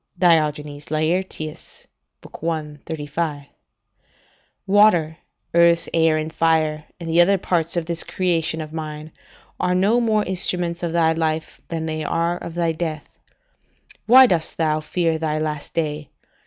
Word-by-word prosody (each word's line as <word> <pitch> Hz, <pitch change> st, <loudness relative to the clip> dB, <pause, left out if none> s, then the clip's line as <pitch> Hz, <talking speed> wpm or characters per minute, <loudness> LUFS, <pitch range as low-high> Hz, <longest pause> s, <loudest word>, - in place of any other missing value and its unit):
[Diogenes 150 Hz, -4 st, +1 dB
Laertius, 155 Hz, 0 st, -3 dB, 0.4 s
i. 155 Hz, -2 st, -4 dB
35.] 150 Hz, -1 st, -3 dB, 1.2 s
Water, 190 Hz, -6 st, +4 dB, 0.4 s
earth, 170 Hz, 0 st, +4 dB
air, 160 Hz, -1 st, +3 dB
and 155 Hz, +1 st, -4 dB
fire, 155 Hz, -2 st, +1 dB
and 170 Hz, -, -7 dB
the 165 Hz, +1 st, +4 dB
other 195 Hz, +3 st, +4 dB
parts 170 Hz, -2 st, -1 dB
of 170 Hz, -, -1 dB
this 170 Hz, 0 st, -3 dB
creation 165 Hz, -3 st, -1 dB
of 155 Hz, 0 st, -8 dB
mine, 155 Hz, -1 st, -6 dB, 0.5 s
are 180 Hz, 0 st, +1 dB
no 205 Hz, +6 st, +3 dB
more 215 Hz, -2 st, +2 dB
instruments 175 Hz, -2 st, 0 dB
of 170 Hz, -2 st, -2 dB
thy 165 Hz, -1 st, +3 dB
life 160 Hz, -1 st, -2 dB
than 165 Hz, -1 st, -4 dB
they 155 Hz, -1 st, -3 dB
are 170 Hz, +3 st, 0 dB
of 170 Hz, -, -8 dB
thy 170 Hz, -1 st, +1 dB
death. 160 Hz, -2 st, -4 dB, 1.0 s
Why 260 Hz, +3 st, +9 dB
dost 170 Hz, -9 st, 0 dB
thou 155 Hz, -1 st, +1 dB
fear 165 Hz, 0 st, -1 dB
thy 155 Hz, -1 st, -1 dB
last 150 Hz, -1 st, -4 dB
day? 150 Hz, -2 st, -2 dB
165 Hz, 140 wpm, -21 LUFS, 155-175 Hz, 1.2 s, Why